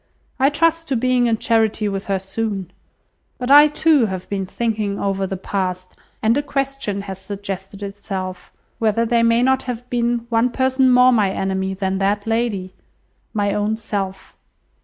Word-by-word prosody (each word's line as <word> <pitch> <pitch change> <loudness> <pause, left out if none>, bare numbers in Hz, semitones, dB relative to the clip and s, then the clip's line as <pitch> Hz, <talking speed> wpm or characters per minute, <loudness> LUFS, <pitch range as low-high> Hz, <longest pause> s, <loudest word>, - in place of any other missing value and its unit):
I 270 +1 +5
trust 330 +2 +1
to 270 - 0
being 250 0 +2
in 225 -1 +1
charity 220 -1 +1
with 195 -1 -4
her 195 -1 +1
soon. 195 -1 -4 0.7
But 250 +2 -2
I 295 +1 +9
too 300 -4 +3
have 185 -2 -5
been 195 -2 -2
thinking 210 -2 -2
over 195 -1 -1
the 190 - -4
past, 185 -1 -3 0.3
and 220 +2 +4
a 290 - +1
question 275 -8 -2
has 190 -1 -7
suggested 195 0 -6
itself, 195 -2 -6 0.3
whether 225 +1 +2
there 235 0 +2
may 230 +1 +3
not 265 +1 +3
have 245 0 -5
been 240 -1 0
one 230 +1 +2
person 260 +1 +2
more 250 +1 +6
my 215 -5 +3
enemy 190 0 -2
even 190 0 -4
than 190 -1 -1
that 200 +1 0
lady? 225 -5 -1 0.6
My 205 -2 0
own 210 +1 0
self. 195 -3 -5
215 Hz, 170 wpm, -20 LUFS, 195-245 Hz, 0.7 s, I